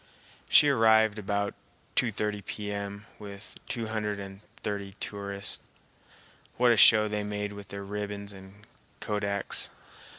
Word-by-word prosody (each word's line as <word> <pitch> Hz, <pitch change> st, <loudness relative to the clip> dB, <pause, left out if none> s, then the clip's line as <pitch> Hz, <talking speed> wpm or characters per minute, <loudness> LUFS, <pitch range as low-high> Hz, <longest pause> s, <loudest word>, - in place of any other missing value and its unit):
She 150 Hz, -, +8 dB
arrived 110 Hz, -4 st, +5 dB
about 100 Hz, 0 st, -1 dB, 0.4 s
2.30 105 Hz, -3 st, 0 dB
P.M. 100 Hz, 0 st, -4 dB
with 100 Hz, 0 st, -8 dB
two 115 Hz, -3 st, -1 dB
hundred 105 Hz, -2 st, -2 dB
and 95 Hz, 0 st, -8 dB, 0.2 s
thirty 100 Hz, -2 st, -3 dB
tourists. 100 Hz, 0 st, -3 dB, 1.0 s
What 125 Hz, 0 st, +5 dB
a -, -, +5 dB
show 110 Hz, 0 st, +8 dB
they 105 Hz, 0 st, -2 dB
made 105 Hz, 0 st, -3 dB
with 100 Hz, -1 st, -9 dB
their 100 Hz, +1 st, -6 dB
ribbons 100 Hz, 0 st, -5 dB
and 95 Hz, +2 st, -13 dB, 0.3 s
kodaks! 100 Hz, -1 st, 0 dB
105 Hz, 125 wpm, -29 LUFS, 100-105 Hz, 1.0 s, She